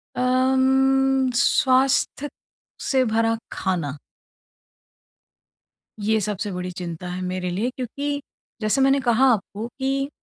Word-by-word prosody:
अम, 265 Hz, +1 st, +2 dB
स्वास्थ्य 270 Hz, +2 st, +2 dB, 0.5 s
से 265 Hz, -2 st, +1 dB
भरा 225 Hz, 0 st, +1 dB
खाना। 165 Hz, -7 st, -2 dB, 2.1 s
ये 220 Hz, 0 st, +2 dB
सबसे 205 Hz, 0 st, -3 dB
बड़ी 180 Hz, 0 st, -4 dB
चिंता 175 Hz, -1 st, -6 dB
है 180 Hz, +1 st, -5 dB
मेरे 180 Hz, 0 st, -3 dB
लिए 205 Hz, +8 st, -1 dB
क्योंकि 280 Hz, +3 st, -4 dB, 0.4 s
जैसे 215 Hz, +6 st, +2 dB
मैंने 270 Hz, +1 st, +4 dB
कहा 245 Hz, +1 st, +3 dB
आपको 215 Hz, +1 st, -4 dB
कि 275 Hz, +1 st, -1 dB
250 Hz, 105 wpm, -23 LUFS, 190-265 Hz, 2.1 s, मैंने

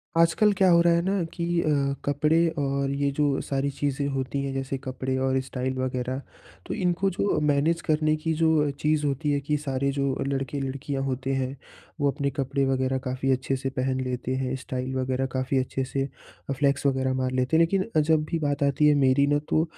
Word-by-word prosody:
आजकल 170 Hz, +6 st, +4 dB
क्या 190 Hz, -1 st, +5 dB
हो 170 Hz, -, +6 dB
रहा 170 Hz, 0 st, +4 dB
है 170 Hz, -, +2 dB
ना 195 Hz, -1 st, +1 dB
कि 170 Hz, -1 st, -3 dB, 0.2 s
अ, -, -, -2 dB, 0.4 s
कपड़े 150 Hz, +4 st, +3 dB
और 140 Hz, 0 st, 0 dB
ये 140 Hz, 0 st, 0 dB
जो 145 Hz, -2 st, +2 dB
सारी 140 Hz, 0 st, -1 dB
चीज़ें 140 Hz, 0 st, -1 dB
होती 135 Hz, 0 st, -2 dB
हैं 135 Hz, -1 st, -3 dB
जैसे 135 Hz, 0 st, -3 dB
कपड़े 130 Hz, 0 st, -3 dB
और 130 Hz, 0 st, +1 dB
स्टाइल 130 Hz, 0 st, -3 dB
वग़ैरह, 130 Hz, 0 st, -2 dB, 0.4 s
तो -, -, -4 dB
इनको 180 Hz, +1 st, +1 dB
जो 195 Hz, 0 st, 0 dB
मैनेज 150 Hz, +3 st, +2 dB
करने 155 Hz, -1 st, +1 dB
की 160 Hz, +1 st, -2 dB
जो 160 Hz, -2 st, +2 dB
चीज़ 150 Hz, 0 st, +1 dB
होती 145 Hz, +1 st, 0 dB
है 145 Hz, -, +1 dB
कि 150 Hz, +2 st, 0 dB
सारे 140 Hz, -1 st, -1 dB
जो 140 Hz, -1 st, 0 dB
लड़के-लड़कियाँ 135 Hz, 0 st, -3 dB
होते 135 Hz, 0 st, -2 dB
हैं, 135 Hz, 0 st, -2 dB, 0.4 s
वो 145 Hz, -1 st, +3 dB
अपने 140 Hz, +1 st, -1 dB
कपड़े 135 Hz, 0 st, -1 dB
वग़ैरह 130 Hz, 0 st, +1 dB
काफ़ी 130 Hz, +1 st, -1 dB
अच्छे 130 Hz, +1 st, 0 dB
से 135 Hz, 0 st, -3 dB
पहन 130 Hz, 0 st, -1 dB
लेते 125 Hz, 0 st, -3 dB
हैं। 130 Hz, 0 st, -2 dB
स्टाइल 130 Hz, -1 st, -4 dB
वग़ैरह 130 Hz, 0 st, 0 dB
काफ़ी 130 Hz, +1 st, 0 dB
अच्छे 130 Hz, +1 st, -2 dB
से, 135 Hz, +1 st, -2 dB, 0.5 s
फ्लेक्स 140 Hz, +1 st, +1 dB
वग़ैरह 130 Hz, -1 st, +1 dB
मार 130 Hz, 0 st, -1 dB
लेते 130 Hz, +4 st, 0 dB
हैं -, -, +5 dB
लेकिन 190 Hz, +3 st, +2 dB, 0.2 s
जब 155 Hz, 0 st, +2 dB
भी 165 Hz, -, 0 dB
बात 145 Hz, -2 st, 0 dB
आती 140 Hz, +2 st, +3 dB
है 150 Hz, -, +5 dB
मेरी 140 Hz, 0 st, +4 dB
ना 145 Hz, 0 st, +2 dB
तो, 155 Hz, -, +3 dB
140 Hz, 200 wpm, -26 LUFS, 130-150 Hz, 0.5 s, हो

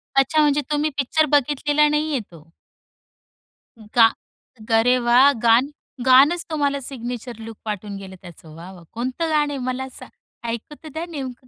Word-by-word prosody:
अच्छा, 270 Hz, +3 st, +3 dB
म्हणजे 295 Hz, -1 st, +2 dB
तुम्ही 300 Hz, +1 st, +1 dB
पिक्चर 290 Hz, +3 st, +2 dB
बघितलेला 290 Hz, +1 st, +2 dB
नाहीये 300 Hz, -1 st, 0 dB
तो? 165 Hz, -1 st, -17 dB, 1.4 s
गा 230 Hz, -, +8 dB, 0.7 s
अरे 250 Hz, +3 st, +3 dB
वाह! 245 Hz, +4 st, +5 dB
गाण 235 Hz, +4 st, +5 dB, 0.4 s
गाणच 280 Hz, +7 st, +5 dB
तुम्हाला 285 Hz, -2 st, 0 dB
सिग्नेचर 245 Hz, -2 st, -7 dB
लूक 225 Hz, 0 st, -9 dB
पाठवून 210 Hz, -1 st, -5 dB
गेलं 190 Hz, -1 st, -10 dB
त्याचं. 165 Hz, -3 st, -14 dB
वाह, 170 Hz, +3 st, -10 dB
वाह! 175 Hz, -2 st, -14 dB
कोणतं 255 Hz, +8 st, -3 dB
गाणं 295 Hz, -2 st, +1 dB
आहे -, -, -4 dB
मला 255 Hz, +1 st, -3 dB
सां -, -, -12 dB, 0.4 s
ऐकु 235 Hz, +6 st, -6 dB
तर 310 Hz, -, -9 dB
द्या 320 Hz, +2 st, -4 dB
नेमकं 260 Hz, -5 st, -7 dB
260 Hz, 150 wpm, -21 LUFS, 230-295 Hz, 1.4 s, गा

